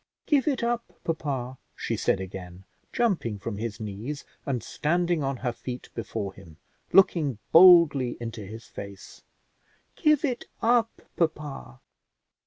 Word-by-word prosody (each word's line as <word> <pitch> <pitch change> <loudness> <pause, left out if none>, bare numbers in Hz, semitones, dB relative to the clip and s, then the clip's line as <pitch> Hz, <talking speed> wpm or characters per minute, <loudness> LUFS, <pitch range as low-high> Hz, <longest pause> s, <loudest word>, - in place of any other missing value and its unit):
"Give 285 -3 +2
it 270 -5 +1
up, 235 0 -2
papa," 135 -6 -3 0.2
she - - -2
said - - +1
again, 95 -1 -8 0.3
jumping 185 - 0
from 100 0 -5
his 110 -2 -4
knees 110 +8 -5 0.2
and 125 -5 -1
standing 175 +1 0
on 135 -1 -1
her 120 - +2
feet 125 +1 -7
before 110 -4 -4
him, 80 -4 -15 0.3
looking 160 - +4
boldly 165 -8 +7
into 115 -2 -6
his 110 +4 -9
face; 100 0 -10 0.7
"give 305 -2 +3
it 250 -4 -2
up, 230 0 +2
papa." 150 - -3
135 Hz, 130 wpm, -27 LUFS, 110-175 Hz, 0.7 s, boldly